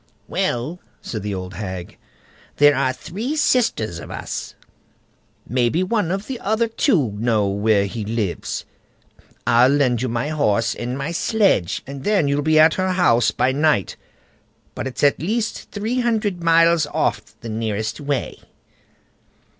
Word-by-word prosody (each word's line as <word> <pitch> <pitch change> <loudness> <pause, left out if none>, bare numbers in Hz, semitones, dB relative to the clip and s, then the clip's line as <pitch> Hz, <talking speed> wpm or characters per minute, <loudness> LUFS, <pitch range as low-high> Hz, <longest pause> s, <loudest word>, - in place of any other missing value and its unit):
"Well!" 140 +9 -2 0.2
said 110 - -5
the 100 0 -3
old 95 0 -6
hag, 95 -2 -6 0.6
"there 145 0 +6
are 130 -1 +1
three 210 - -5
sisters 220 - +1
of - - -9
us; - - -6 0.9
maybe 125 +8 +1
one 205 -2 0
of 195 +3 -2
the 260 -3 -5
other 220 +3 0
two 200 - +1
know 110 -3 +1
where 100 0 +2
he 110 +2 -5
lives. 105 -4 -3 0.8
I'll 120 +2 +5
lend 135 -4 +2
you 130 - -1
my 120 +5 -2
horse 115 -7 +1
and 125 +2 -4 0.2
sledge, 195 - +1
and 140 0 -8
then 200 -8 +2
you'll 140 +1 +1
be 155 +1 +2
at 155 +1 +6
her 185 0 0
house 120 - +3
by 130 - +1
night; 145 -7 +1 0.8
but - - -4
it's 130 - -5
at 145 - +4
least 215 +7 -2
three 220 +5 -2
hundred 220 -6 0
miles 165 -1 +4
off, - - -2
the 115 - -7
nearest 110 -1 -3
way." 145 -2 -2
140 Hz, 145 wpm, -21 LUFS, 115-185 Hz, 0.9 s, there